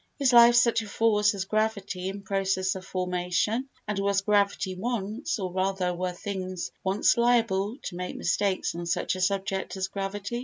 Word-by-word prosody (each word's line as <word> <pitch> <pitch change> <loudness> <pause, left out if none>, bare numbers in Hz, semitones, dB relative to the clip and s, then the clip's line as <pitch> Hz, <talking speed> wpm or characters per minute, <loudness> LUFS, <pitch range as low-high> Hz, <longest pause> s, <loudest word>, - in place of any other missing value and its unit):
Is 270 -3 +2
life 235 0 +8
such 235 -1 +4
a 220 - -8
force 210 -1 +2
as 190 -1 -3
gravity 200 -3 -1
in 200 +1 -7
process 190 -1 0
of 190 - -7
formation, 185 +7 -1 0.2
and 210 -1 -2
was 200 0 +1
gravity 200 -2 +1
once—or 210 -1 -3
rather, 185 -1 0
were 180 +1 -2
things 185 -1 -5
once 195 +5 +2
liable 230 -3 +2
to 175 - -5
make 180 0 -5
mistakes 190 +2 0
on 170 0 -5
such - - 0
a 185 - -5
subject 195 0 -1
as 190 0 -1
gravity? 200 +4 -4
195 Hz, 165 wpm, -27 LUFS, 185-215 Hz, 0.2 s, life